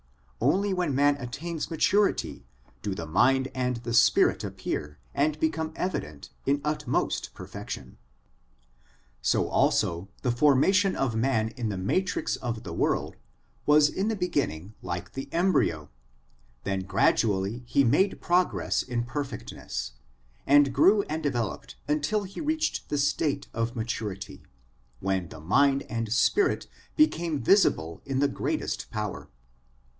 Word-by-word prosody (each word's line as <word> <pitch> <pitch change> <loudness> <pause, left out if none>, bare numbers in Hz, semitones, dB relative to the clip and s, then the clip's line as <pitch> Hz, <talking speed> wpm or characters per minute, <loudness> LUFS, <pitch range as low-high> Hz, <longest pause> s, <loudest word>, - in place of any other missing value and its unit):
Only 200 +1 +2
when 175 -7 0
man 145 +1 +4
attains 145 +5 -5
maturity 170 - +1 0.3
do 100 -2 -3
the 85 - -5
mind 130 - +3
and 125 -1 -1
the 120 0 -5
spirit 115 - +4
appear 75 0 -4 0.2
and 150 +2 +1
become 160 0 -1
evident 75 - -4 0.2
in 140 +1 +3
utmost 150 -3 -1
perfection. - - -8 1.2
So - - +2
also 85 +3 +1
the 125 - +2
formation 150 +10 +4
of 130 -4 -1
man 110 -2 +1
in 115 -1 -4
the 100 - -3
matrix 180 - 0
of 115 -3 -4
the - - -6
world - - 0 0.5
was 150 0 +6
in 195 +6 -2
the 225 - 0
beginning 140 - -2
like 90 -1 -5
the 135 - -6
embryo; 165 - +1 0.7
then 95 -1 -1
gradually 95 +3 +1
he 140 +3 +3
made 150 - +2
progress 180 +1 +1
in 120 -2 -2
perfectness, 120 - -5 0.6
and 140 -1 +5
grew 200 +9 +5
and 155 -2 -4
developed 115 - -3
until 150 +8 0
he 195 - -7
reached 315 0 -1
the 145 - 0
state 145 0 0
of 115 +2 -2
maturity, 110 -4 -4 0.6
when 95 -3 -1
the - - -10
mind 135 - +3
and 115 -2 -4
spirit 375 - +2 0.3
became 170 - +2
visible 110 - +2
in 135 -1 -3
the 140 +1 +3
greatest 140 - -3
power. 105 -2 -4
135 Hz, 130 wpm, -27 LUFS, 110-160 Hz, 1.2 s, was